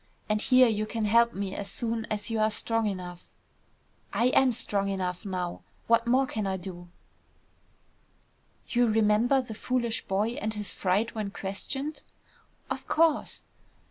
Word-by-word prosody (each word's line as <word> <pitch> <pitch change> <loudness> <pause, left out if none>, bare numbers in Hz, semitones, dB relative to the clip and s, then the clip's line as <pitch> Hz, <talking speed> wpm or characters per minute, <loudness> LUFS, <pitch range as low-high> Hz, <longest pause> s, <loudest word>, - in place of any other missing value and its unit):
And 215 0 +1
here 255 +1 +6
you 215 -1 0
can 225 -1 -2
help 235 +2 +5
me 195 -1 -3
as 200 0 -5
soon 230 -1 -3
as 215 +1 -3
you 225 - 0
are 215 0 +4
strong 225 +1 0
enough." 180 -3 -5 0.8
"I 240 +2 +3
am 265 0 +4
strong 200 -3 -1
enough 185 0 -3
now. 180 -2 -3 0.2
What 230 0 +3
more 260 +3 +4
can 215 -5 -3
I 190 0 -1
do?" 175 -1 -8 1.8
"You 245 -1 +3
remember 225 +4 +3
the 230 - -7
foolish 235 +1 -1
boy 200 +3 +1
and 230 -3 -3
his 210 -2 -3
fright 200 +5 0
when 215 -2 -3
questioned?" 270 +11 -4 0.7
"Of 270 0 -5
course." 325 -1 +2
215 Hz, 150 wpm, -28 LUFS, 195-235 Hz, 1.8 s, here